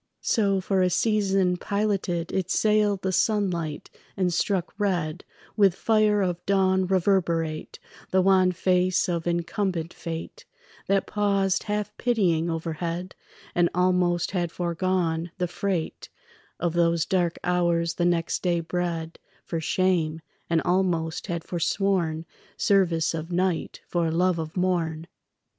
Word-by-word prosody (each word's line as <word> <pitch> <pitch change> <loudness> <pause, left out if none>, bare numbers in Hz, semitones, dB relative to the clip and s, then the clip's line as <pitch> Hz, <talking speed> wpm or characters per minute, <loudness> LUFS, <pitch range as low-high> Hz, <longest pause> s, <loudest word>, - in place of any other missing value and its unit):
So 200 -3 +2
for 190 0 0
a 185 - +3
season 195 -1 +2
piloted 195 -4 -1
It 185 -2 -1
sailed 210 -2 +2
the 190 - 0
sunlight, 180 -7 0 0.3
and 180 -2 +1
struck 185 0 0
red 175 -7 -1 0.3
With 195 -4 +4
fire 215 -2 +2
of 180 -1 -2
dawn 190 -1 +2
reverberate 170 -4 0 0.3
The 185 0 +3
wan 185 -1 +4
face 180 0 +1
of 170 -2 -2
incumbent 175 0 -1
fate 165 - -7 0.4
That 195 -1 +2
paused 200 -2 +1
half 210 0 -2
pitying 180 -9 +1
overhead 165 +2 -3 0.4
And 175 -1 +3
almost 180 -1 +2
had 175 -3 -1
foregone 170 -1 -1
the 180 -1 0
freight 175 -1 -3 0.5
Of 175 -2 0
those 170 -1 +2
dark 175 -4 0
hours 170 -1 +1
the 175 - 0
next 170 -1 0
day 175 -2 +1
bred 170 -1 -3 0.3
For 165 - -3
shame, 165 -2 +1 0.3
and 165 -2 +2
almost 175 -3 0
had 170 -3 -3
forsworn 170 -2 0 0.3
Service 175 -5 +2
of 165 +1 -5
night 180 -1 -1
for 170 -2 0
love 175 +1 +1
of 160 +2 -5
morn. 170 -3 0
180 Hz, 130 wpm, -25 LUFS, 170-190 Hz, 0.5 s, With